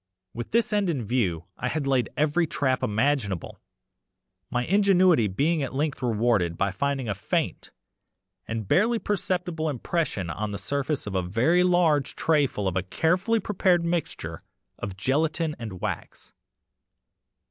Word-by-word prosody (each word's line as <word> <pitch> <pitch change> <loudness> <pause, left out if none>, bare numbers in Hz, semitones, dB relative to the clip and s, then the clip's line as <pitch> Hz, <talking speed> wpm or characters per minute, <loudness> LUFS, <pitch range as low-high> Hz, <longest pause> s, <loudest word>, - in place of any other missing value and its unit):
With 120 +1 -6
this 230 0 +1
end 205 -3 +2
in 140 -8 -1
view 95 -8 0
I 125 +5 -1
laid 135 -4 +1
every 155 +3 +2
trap 130 -3 0
imaginable, 110 - -1 0.9
my 125 0 -1
ingenuity 185 - +4
being 150 - +1
at 135 -1 -4
length 145 0 -1
rewarded 110 -8 +1
by 100 0 +1
finding 135 +5 -1
a 105 - 0
faint 90 -2 -2 0.8
and 115 -3 -4
barely 225 - +3
perceptible 180 -6 -1
impression 130 - -2
on 105 +6 -3
the 100 - -4
surface 140 +7 -2
of 105 - -5
a 95 - +1
very 115 - +2
large 170 -6 +2
tray 150 -3 +3
full 105 -5 -3
of 95 - -1
a 95 - +2
carefully 180 - +1
prepared 185 -4 +2
mixture 170 -2 -3 0.4
of 95 -2 -5
gelatine 155 - 0
and 110 -6 -7
wax. - - -5
140 Hz, 145 wpm, -26 LUFS, 105-170 Hz, 0.9 s, ingenuity